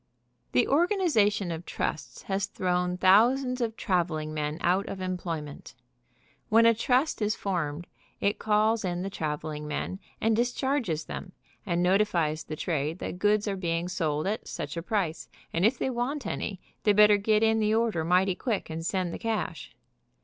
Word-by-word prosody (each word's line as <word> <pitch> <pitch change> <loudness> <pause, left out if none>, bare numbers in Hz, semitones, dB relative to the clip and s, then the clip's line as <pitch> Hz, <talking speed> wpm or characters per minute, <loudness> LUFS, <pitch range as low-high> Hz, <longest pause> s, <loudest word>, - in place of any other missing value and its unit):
The 125 - +3
organization 275 - +2
of 165 +1 -5
trusts 135 -7 -4
has 195 +1 -1
thrown 180 -2 -1
thousands 250 +7 +4
of 225 -2 -2
traveling 165 -5 -1
men 150 0 -2
out 185 +3 +1
of 195 - -5
employment. 170 -5 -5 0.7
When 225 +2 +6
a 230 - +7
trust 250 +4 +1
is 210 +1 +1
formed 175 -4 -2 0.3
it 200 +1 0
calls 215 +1 +2
in 180 -1 -2
the 195 - -4
traveling 150 -2 -4
men 185 +5 -3 0.2
and 225 0 +2
discharges 245 - 0
them, 185 - -7 0.3
and 175 -1 +1
notifies 180 -5 +2
the 155 - -5
trade 155 -1 -2
that 180 - -6
goods 210 +1 +2
are 200 - -1
being 170 -2 -1
sold 155 -4 -1
at 210 +3 -2
such 145 - -5
a 170 - -3
price, 180 -5 -2 0.2
and 175 +5 +4
if 245 +3 0
they 265 - -1
want 250 +2 -2
any 200 -2 -3 0.2
they 210 - +4
better 210 0 +7
get 215 +2 +2
in 220 0 +3
the 215 0 +2
order 225 -8 +1
mighty 180 +3 +3
quick, 210 -3 -3
and 160 +1 -4
send 180 -1 -1
the - - -5
cash. 225 -1 -3
190 Hz, 170 wpm, -28 LUFS, 165-220 Hz, 0.7 s, a